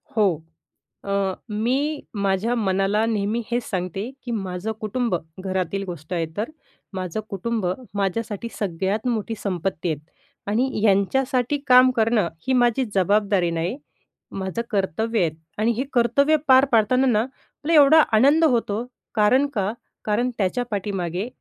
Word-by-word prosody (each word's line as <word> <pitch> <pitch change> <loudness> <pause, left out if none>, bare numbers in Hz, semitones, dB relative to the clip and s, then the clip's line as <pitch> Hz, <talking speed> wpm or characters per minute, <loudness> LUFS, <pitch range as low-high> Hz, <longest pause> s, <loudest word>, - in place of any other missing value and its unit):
हो. 215 - +4 0.8
अ, 200 -1 0 0.2
मी 220 +4 0 0.5
माझ्या 200 +5 +1
मनाला 200 0 +1
नेहमी 220 +1 0
हेच 240 0 0
सांगते, 190 +4 -3
की 240 - -5
माझं 195 0 -3
कुटुंब, 225 -1 -1 0.3
घरातील 190 +1 -2
गोष्ट 170 -2 -7
आहे 170 -2 0
तर, 220 +3 -2 0.4
माझं 185 +1 -3
कुटुंब 210 +1 -2 0.3
माझ्यासाठी 205 +3 -2
सगळ्यात 195 +4 -1
मोठी 225 -2 -1
संपत्ती 185 -2 -2
आहेत 155 -3 -2 0.5
आणि 225 +6 +1
ह्यांच्यासाठी 250 +7 +2
काम 255 0 +7
करणं 220 -4 +3 0.2
ही 260 - +2
माझी 245 +1 +3
जबाबदारी 200 -1 +2
नाही, 170 +8 -2 0.5
माझं 190 +3 -3
कर्तव्य 215 +3 0
आहेत 160 -3 +1 0.3
आणि 225 +2 +3
हे 260 - 0
कर्तव्य 260 +6 +3
पार 260 +1 +7
पाडताना 250 +4 +3
ना, 225 -4 +3
आपल्याला 295 +4 +1
एवढा 310 +3 +7 0.2
आनंद 285 +8 +5
होतो, 235 -5 +1 0.3
कारण 250 +7 +4
का? 200 0 0 0.3
कारण 220 +4 +1
त्याच्या 200 +4 0
पाठीमागे 195 -1 -2
215 Hz, 135 wpm, -23 LUFS, 190-240 Hz, 0.8 s, काम